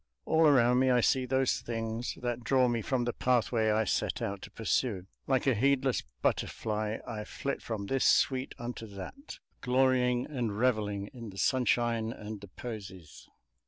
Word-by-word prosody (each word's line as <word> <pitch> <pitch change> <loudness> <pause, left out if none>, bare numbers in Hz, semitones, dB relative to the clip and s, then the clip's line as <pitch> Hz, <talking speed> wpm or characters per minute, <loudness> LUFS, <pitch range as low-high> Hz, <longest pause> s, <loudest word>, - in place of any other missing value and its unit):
All 160 0 +4
around 125 -3 +5
me 130 0 +3
I 125 -1 +4
see 130 +2 +2
those 130 0 +1
things 115 0 -4
that 120 -1 -2
draw 130 +1 +3
me 120 -1 0
from 125 +3 0
the 120 0 -1
pathway 120 -3 +1
I 110 +1 +3
set 105 - -1
out 100 -1 -3
to - - -9
pursue: 110 -4 -1 0.2
like 130 -2 +2
a 135 - +4
heedless 130 +2 +2 0.2
butterfly 110 0 -1
I 110 -3 -5
flit 140 +5 -4
from 110 -3 -4
this 135 +5 0
sweet 130 -1 +2
unto 120 -1 -6
that, 105 - -9 0.2
glorying 125 -1 +2
and 120 -8 -3
revelling 105 -4 0
in 120 -4 -8
the 95 - -11
sunshine 120 -2 +1
and 105 -2 -7
the 100 - -9
posies. 95 -6 -9
120 Hz, 165 wpm, -30 LUFS, 110-130 Hz, 0.2 s, around